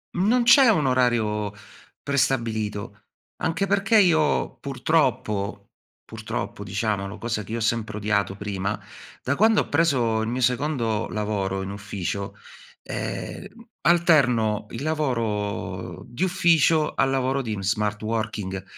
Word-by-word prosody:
non 225 +7 +3
c'è 240 +1 +7
un 155 -10 +3
orario 110 -5 +1 0.5
prestabilito, 110 -6 -1 0.4
anche 165 +4 0
perché 200 +3 +3
io 160 -5 +2
purtroppo 130 -8 0 0.5
purtroppo, 105 - -5
diciamolo, 100 0 -2
cosa 115 -2 -3
che 110 - -11
io - - -1
ho - - -4
sempre 110 -1 -1
odiato 100 -2 0
prima, 100 0 -3 0.4
da 140 +2 0
quando 220 0 +4
ho - - -6
preso 125 -8 +2
il 110 - -2
mio 125 +2 -2
secondo 120 -3 0
lavoro 100 -3 -2
in 95 - -5
ufficio, 100 0 -4 0.5
ehm, - - -5 0.3
alterno 125 - +3
il 120 +5 -6
lavoro 115 -10 -2
di 120 +10 -3
ufficio 165 -4 +3
al 135 - +2
lavoro 135 0 0
di 115 -4 -3
in 95 -2 -5
smart 105 +1 -1
working. 105 -4 -3
115 Hz, 130 wpm, -24 LUFS, 105-150 Hz, 0.5 s, c'è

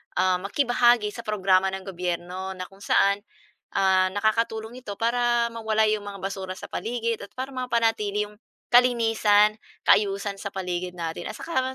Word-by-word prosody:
ah, 185 0 +2
makibahagi 240 +1 +2
sa - - -10
programa 190 -2 +3
ng 190 - -7
gobyerno, 180 0 -4
na 185 - -5
kung 195 - -19
saan, 200 0 +3 0.6
ah, 190 -1 +4
nakakatulong 220 +3 -1
ito 205 -5 -7
para, 235 +1 +1
mawala 220 -1 +1
'yong 215 0 +1
mga 200 -1 -7
basura 190 -1 -4
sa - - -10
paligid, 230 -1 -2
at 200 - -8
para 265 +2 -4
mapanatili 225 -5 0
'yong 210 0 -15 0.3
kalinisan, 225 -3 +4 0.2
kaayusan 200 -1 +2
sa 200 - -4
paligid 180 -2 -4
natin, 165 -1 -4
at - - -7
saka 335 -6 -1
210 Hz, 155 wpm, -25 LUFS, 190-230 Hz, 0.6 s, ah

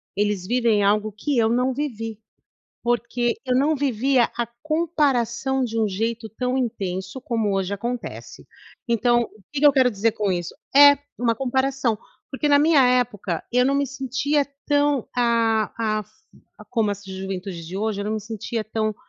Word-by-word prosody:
eles 205 -2 -1
vivem 230 -3 +2
algo 210 +1 +2
que 250 +6 -2
eu 225 -1 +3
não 250 +2 +1
vivi, 225 -6 -4 0.7
porque 240 0 0
eu 255 -1 +1
não 295 +4 +3
vivia 265 -2 +2
a 235 -1 -1 0.2
comparação 270 -5 0
de 230 -1 -3
um 215 - +2
jeito 225 +3 -2
tão 250 +3 -2
intenso 190 -3 -3
como 225 -5 -1
hoje 195 +1 -1
acontece. 240 +4 -6 0.4
Então, 240 +1 +3
o 215 -3 -10
que 290 - -2
que 295 - +6
eu 285 - +7
quero 260 -2 +4
dizer 215 +2 +1
com 205 -2 -1
isso? 175 -1 -3 0.2
É, 285 0 +8 0.2
uma 235 -1 +2
comparação, 265 -2 0 0.3
porque 290 +2 -1
na 285 0 +6
minha 295 -3 +5
época 225 -8 0
eu 250 0 +4
não 275 +1 +2
me 280 0 +1
sentia 275 +2 -1 0.2
tão, 290 -3 +2
ah 230 -2 +2
ah, 215 -1 0 0.7
como 225 -4 +1
essa 200 -1 -6
juventude 190 -2 -5
de 180 +4 -7
hoje, 210 -1 -1
eu - - -3
não 215 +1 -1
me 215 - -2
sentia 220 +1 -4
tão 215 -1 -2
235 Hz, 170 wpm, -23 LUFS, 210-265 Hz, 0.7 s, É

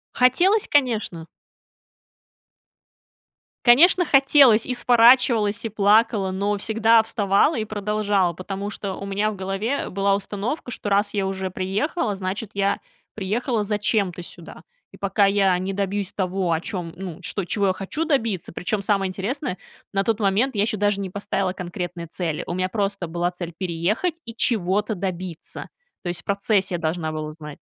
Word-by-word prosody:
Хотелось, 350 - +3
конечно. 220 - 0 2.4
Конечно, 340 +9 +6
хотелось, 270 -5 +5
и 250 - -1
сворачивалась, 235 -3 +4
и - - -1
плакала, 210 -1 +3
но 200 +2 -1
всегда 225 +1 +4
вставала 215 +5 +2
и 215 - -1
продолжала, 205 -3 0
потому 195 +3 -5
что 200 -2 -5
у 200 - -7
меня 205 +2 0
в - - -7
голове 195 +8 -2
была 195 +1 +1
установка, 205 +8 -4
что 220 - -6
раз 205 +1 +1
я 195 - 0
уже 190 -1 -3
приехала, 205 - -1
значит, 195 +3 -4
я 200 0 +1 0.4
приехала 220 +3 -1
зачем-то 205 -3 0
сюда, 170 -1 -11 0.3
и - - -14
пока 200 +1 +2
я 195 -2 +3
не 190 +2 -3
добьюсь 200 0 -2
того, 185 -2 -1
о 160 - +1
чём, 175 -3 -5
ну, 180 -4 -7
что, 200 - -2
чего 200 +3 0
я 185 - +2
хочу 250 +13 -3
добиться 230 - -1
Причём, 200 +4 -2
самое 195 -2 +1
интересное, 205 +3 -3 0.4
на 195 - +1
тот 225 +2 0
момент 210 +7 +1
я 200 - +1
ещё 215 0 0
даже 205 0 +1
не 190 - -4
поставила 195 -1 -2
конкретные 175 -1 -5
цели, 165 -1 -3
у - - -4
меня 185 +1 -1
просто 200 -4 -2
была 175 +2 -1
цель 175 -1 -6
переехать 200 - -1
и 230 -1 -8
чего-то 210 -3 +1
добиться. 180 -3 -6 0.3
То 175 - -3
есть 175 0 -3
в - - -38
процессе 200 -2 0
я 170 - -3
должна 160 0 -2
была 155 -1 -4
узнать. 150 -1 -10
200 Hz, 160 wpm, -23 LUFS, 185-220 Hz, 2.4 s, Конечно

